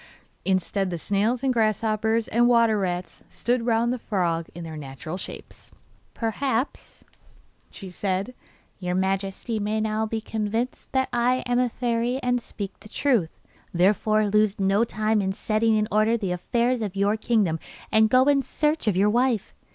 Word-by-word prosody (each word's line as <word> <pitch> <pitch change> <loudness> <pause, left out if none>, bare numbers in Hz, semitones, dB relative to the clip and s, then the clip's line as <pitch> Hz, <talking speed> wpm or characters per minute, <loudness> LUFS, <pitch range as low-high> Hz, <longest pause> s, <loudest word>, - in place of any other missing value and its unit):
Instead 190 +1 0
the 175 - -3
snails 210 +8 0
and 265 -1 +2
grasshoppers 220 0 +1
and 240 +1 +3
water 230 -3 +4
rats 180 -2 -3
stood 240 0 -1
round 235 +1 +2
the 250 - -4
frog 170 -7 -1
in 175 - -7
their 160 -1 -7
natural 150 +3 -7
shapes. 190 - -9 0.4
'Perhaps,' 235 +3 -2 0.6
said 195 +3 -3
she, - - -33
'your 180 0 -1
Majesty 195 +4 -1
may 210 +1 -1
now 215 0 0
be 220 +1 -2
convinced 225 +3 -3
that 265 -1 +1
I 245 +1 +2
am 245 0 +1
a 250 -1 +2
fairy 240 +1 -1
and 245 -1 +1
speak 200 -3 -7
the 215 - -14
truth. 230 - 0 0.4
Therefore 210 +4 +3
lose 210 0 +2
no 195 +3 +3
time 215 -1 0
in 190 -1 -1
setting 220 +2 +1
in 215 0 +1
order 215 +2 +3
the 195 -5 -3
affairs 235 +7 0
of 200 -3 -3
your 200 +2 +2
kingdom 215 -8 +1 0.3
and 220 0 +5
go 255 +3 +5
in 280 0 +3
search 300 0 -1
of 195 -4 +2
your 205 +2 +4
wife. 240 -3 +1
215 Hz, 165 wpm, -25 LUFS, 195-235 Hz, 0.6 s, and